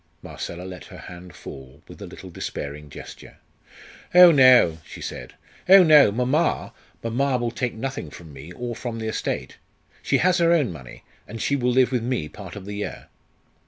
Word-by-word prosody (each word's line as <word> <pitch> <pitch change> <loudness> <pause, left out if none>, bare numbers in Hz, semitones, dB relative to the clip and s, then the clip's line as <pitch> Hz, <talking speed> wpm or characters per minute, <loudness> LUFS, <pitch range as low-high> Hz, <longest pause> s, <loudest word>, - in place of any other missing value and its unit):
Marcella 85 +1 -7
let 90 -1 -9
her - - -12
hand 90 -1 -11
fall 65 +2 -12
with - - -13
a - - -7
little - - -11
despairing 75 +1 -6
gesture. - - -12 0.8
"Oh 180 -1 +10
no!" 130 - +6
she - - -12
said - - -8 0.3
"oh 195 0 +9
no! 150 -9 +7
Mamma 130 +9 0 0.3
mamma 130 +3 0
will 120 -1 -2
take 120 +1 -3
nothing 130 - -5
from 80 0 -13
me 70 +5 -11
or 120 +1 -5
from 120 -1 -5
the 110 -1 -4
estate. 110 - -4 0.4
She - - +1
has 180 0 +2
her 170 0 +3
own 145 - +1
money, 65 -6 -12 0.2
and 115 - -8
she 140 - 0
will 125 -2 0
live 130 0 +3
with 125 -2 0
me 120 -9 -2
part 95 +4 -11
of 100 -2 -9
the 105 - -6
year." 105 - -6
115 Hz, 185 wpm, -23 LUFS, 85-130 Hz, 0.8 s, Oh